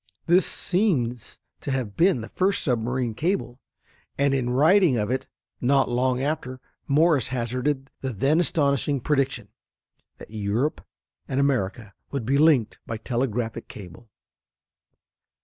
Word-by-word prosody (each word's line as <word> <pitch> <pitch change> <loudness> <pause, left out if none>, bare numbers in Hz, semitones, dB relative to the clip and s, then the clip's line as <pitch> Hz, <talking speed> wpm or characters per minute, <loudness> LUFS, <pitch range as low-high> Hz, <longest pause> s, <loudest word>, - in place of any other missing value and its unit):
This 175 +2 +4
seems 140 - -1 0.2
to - - -6
have 130 -7 -2
been 175 -7 +3
the 110 - -8
first 195 +2 0
submarine 120 -2 -1
cable, 155 - -2 0.6
and 140 0 +2
in 130 -3 0
writing 155 +3 +4
of 105 +1 -1
it 130 +1 -2 0.3
not 135 +1 +3
long 125 +1 +1
after 140 -4 -3 0.3
Morse 150 -2 +3
hazarded 130 +3 -2
the 130 - -2
then 135 - +2
astonishing 140 -4 +1
prediction 135 -5 -1 0.7
that - - -13
Europe 110 +7 -1 0.4
and 130 - -1
America 115 -6 -1 0.2
would 135 -5 -4
be 140 +4 +2
linked 150 -8 +3
by 115 - -3
telegraphic 115 -1 -2
cable. 100 +3 -12
130 Hz, 130 wpm, -25 LUFS, 120-145 Hz, 0.7 s, This